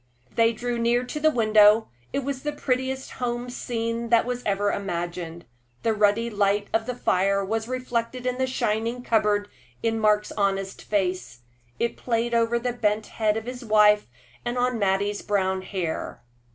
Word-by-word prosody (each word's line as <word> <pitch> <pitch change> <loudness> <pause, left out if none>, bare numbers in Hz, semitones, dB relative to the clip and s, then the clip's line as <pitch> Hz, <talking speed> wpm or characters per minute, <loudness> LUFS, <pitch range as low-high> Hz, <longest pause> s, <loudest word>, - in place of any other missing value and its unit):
They 230 0 +4
drew 240 +1 -3
near 240 +1 +2
to 275 +4 -5
the 310 +1 +4
window. 215 -3 +5 0.2
It 275 - -1
was 270 0 -3
the 295 - -2
prettiest 265 -1 -2
home 245 0 -3
scene 230 -1 -3
that 230 -1 +4
was 245 0 -3
ever 205 0 +1
imagined. 175 -3 -4 0.4
The 225 - +2
ruddy 210 +2 +2
light 205 -2 +1
of 225 +1 +1
the 250 - -2
fire 195 -3 +1
was 220 +2 -2
reflected 250 -1 -3
in 250 0 -1
the 260 - +1
shining 230 0 -1
cupboard, 210 -3 +2 0.4
in 225 -1 +1
Mark's 210 -1 +2
honest 195 -1 -1
face 185 - -2 0.4
it 235 - -1
played 235 0 -1
over 230 0 +2
the 245 +1 -2
bent 215 -2 0
head 215 -1 0
of 225 - -5
his 250 +1 -6
wife, 210 -1 +5 0.4
and 240 +1 -2
on 245 -1 +1
Mattie's 200 +1 +1
brown 190 -2 0
hair. 185 -4 -4
225 Hz, 165 wpm, -25 LUFS, 205-245 Hz, 0.4 s, window